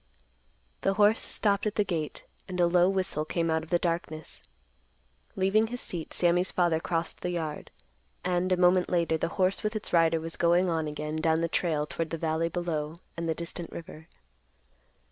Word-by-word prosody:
The 195 - +1
horse 210 +2 +5
stopped 200 0 +1
at 210 - -2
the 210 - +3
gate 165 -6 -3 0.2
and 180 -1 -5
a 175 - +5
low 175 +1 +4
whistle 185 -5 -1
came 165 +1 -1
out 160 0 +1
of 160 - -11
the 175 - +3
darkness. 165 -3 -3 0.9
Leaving 200 +3 +3
his 245 +2 -5
seat, 170 -8 -4
Sammy's 175 +1 +2
father 170 -3 +2
crossed 165 0 -2
the 180 - -2
yard, 160 -4 -4 0.6
and, 180 +1 +1
a 185 - +4
moment 180 0 +4
later, 170 -2 +2
the - - 0
horse 190 0 +2
with 215 +1 -2
its 215 - -2
rider 165 -1 +4
was 165 +1 -5
going 175 +1 +3
on 160 -2 0
again 150 +1 -4
down 160 0 +2
the 170 - +1
trail 160 -3 0
toward 165 0 -3
the 165 - -3
valley 160 +1 0
below 165 -3 -3 0.2
and 170 0 -3
the 160 - +1
distant 170 +1 -6
river. 160 -1 -9
170 Hz, 185 wpm, -28 LUFS, 160-185 Hz, 0.9 s, horse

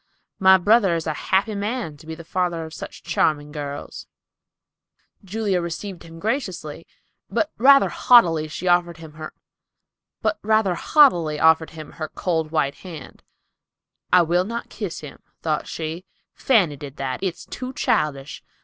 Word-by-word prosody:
My 190 0 +7
brother 200 -1 +3
is 165 - -3
a 155 - -1 0.2
happy 195 +3 +2
man 205 -4 -3
to 155 +2 -16
be 160 - -5
father 170 0 -2
of 160 - -10
such - - -9
charming 150 -1 0
girls." 145 -1 -7 1.2
Julia 195 -2 -1
received 170 +2 -6
him 165 0 -12
graciously, 190 - -3 0.4
but 315 - 0
rather 275 +3 +6
haughtily 165 -11 +4 0.2
offered 175 -1 +2
him 160 -2 -11
her 155 0 -8 2.8
cold 165 -5 -1
white 155 -3 0
hand. 170 -5 -10 0.9
"I 180 -1 +6
will 175 +2 +2
not 230 +3 -5
kiss 205 -7 -5
him," 150 -3 -11 0.2
thought 155 -2 -1
she; 160 +2 -5 0.3
"Fanny 190 - +2
did 145 -1 -9
that. 130 -2 -4
It's 185 -2 -4
too 255 0 -6
childish. 145 - -1
170 Hz, 125 wpm, -22 LUFS, 155-200 Hz, 2.8 s, My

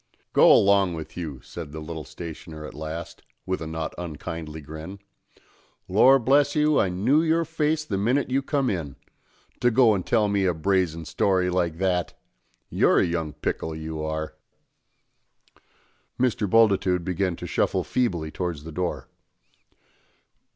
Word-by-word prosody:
"Go - - +7
along 100 -3 +4
with 80 -1 -8
you!" 75 -7 -6
said 80 -4 -8
the 80 - -7
little 80 0 -6
stationer 80 -2 -8
at - - -9
last, 80 +2 -7 0.2
with 95 -2 -2
a 80 - -4
not 80 0 -4
unkindly 80 -1 -6
grin. 80 +6 -8 0.9
"Lor 125 +8 +6
bless 140 +3 +3
you, 150 0 +3
I 95 - +2
knew 115 - +2
your 165 +1 +2
face 155 -1 -1
the 100 -9 -2
minnit 125 +6 +1
you 135 +1 +2
come 140 -1 0
in. 80 - -3 0.6
To 120 - +3
go 120 -2 +5
and 95 -3 -1
tell 110 0 +2
me 100 -1 +1
a 90 -2 +1
brazen 85 -1 0
story 90 +1 +1
like 85 -3 0
that! 90 -1 -1 0.5
You're - - +3
a - - +4
young 85 -3 -2
pickle, 80 +1 -3
you 80 0 -5
are!" 80 0 -3 1.9
Mr. 120 -5 +1
Bultitude 95 -5 +3
began 90 -1 -1
to - - -8
shuffle - - 0
feebly 85 -11 -1
towards 85 -5 -4
the 80 - -8
door. 90 +2 -3
90 Hz, 150 wpm, -25 LUFS, 80-115 Hz, 1.9 s, Go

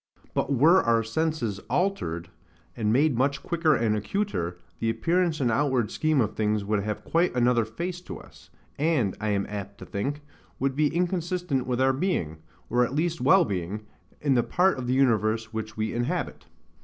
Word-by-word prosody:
But - - -1
were 155 +8 +5
our 115 -1 +2
senses 120 -4 -1
altered, 120 - -1 0.5
and 110 -3 0
made 140 +3 +3
much 140 +2 +1
quicker 165 -3 +2
and 110 -3 +1
acuter, 105 - -2 0.2
the 115 - 0
appearance 170 +5 +1
and 125 -4 +1
outward 130 -2 +1
scheme 155 -2 +1
of 110 - -1
things 105 -1 0
would 105 0 0
have 105 +1 -4
quite 170 -3 +1
another 120 -2 +3
face 175 +11 -5
to - - -8
us; - - -16 0.3
and, 145 - +1
I 105 - -1
am 100 -1 0
apt 100 -1 -6
to - - -10
think, 140 +9 -3 0.4
would 135 -1 -1
be 150 +1 +3
inconsistent 175 -4 -1
with 125 -1 -1
our 130 0 +4
being, 130 - -1 0.3
or 125 0 +2
at 125 +3 -2
least 170 +2 0
wellbeing, 105 - +2 0.4
in 145 -2 +2
the 120 - +4
part 180 +5 +2
of 125 - -4
the 125 - +1
universe 110 -3 +2
which 110 -1 -5
we 110 0 -1
inhabit. 120 +1 -3
125 Hz, 180 wpm, -26 LUFS, 110-160 Hz, 0.5 s, were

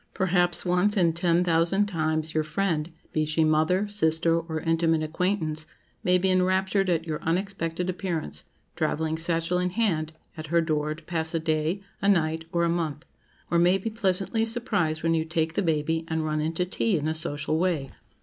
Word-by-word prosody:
Perhaps 180 -2 +1
once 180 +4 +2
in 170 -3 +3
ten 170 +1 +2
thousand 175 +4 +2
times, 160 -4 -1
your 155 - +1
friend—be 160 -2 -2
she 155 +1 +1
mother, 160 +6 +2
sister, 165 -4 +2
or 160 -1 -4
intimate 165 -1 +1
acquaintance—may 165 +1 -1
be 190 +1 +2
enraptured 190 +1 +2
at 165 -2 +1
your 155 -2 -4
unexpected 175 -1 -2
appearance, 175 - -3 0.3
travelling 160 0 -1
satchel 165 +2 0
in 180 0 0
hand, 175 -7 0 0.2
at 155 0 -6
her 170 +2 +3
door, 155 -2 0
to 160 - -15
pass 160 0 -2
a - - +2
day, 155 +4 -1 0.2
a 200 - +3
night, 160 -3 +1
or 170 0 +1
a - - +3
month; 165 -2 -2 0.5
or 170 - +3
may 180 +2 +4
be 220 +4 -4
pleasantly 200 0 0
surprised 210 -10 -1
when 165 0 +2
you 160 -1 +1
take 160 0 -1
the 205 - 0
baby, 160 -1 0
and 160 -1 -1
run 155 0 -1
in 160 +2 -1
to 180 +2 0
tea 190 +2 0
in 150 0 -2
a 160 - 0
social 155 -1 -1
way. 165 -7 0
165 Hz, 180 wpm, -26 LUFS, 155-185 Hz, 0.5 s, may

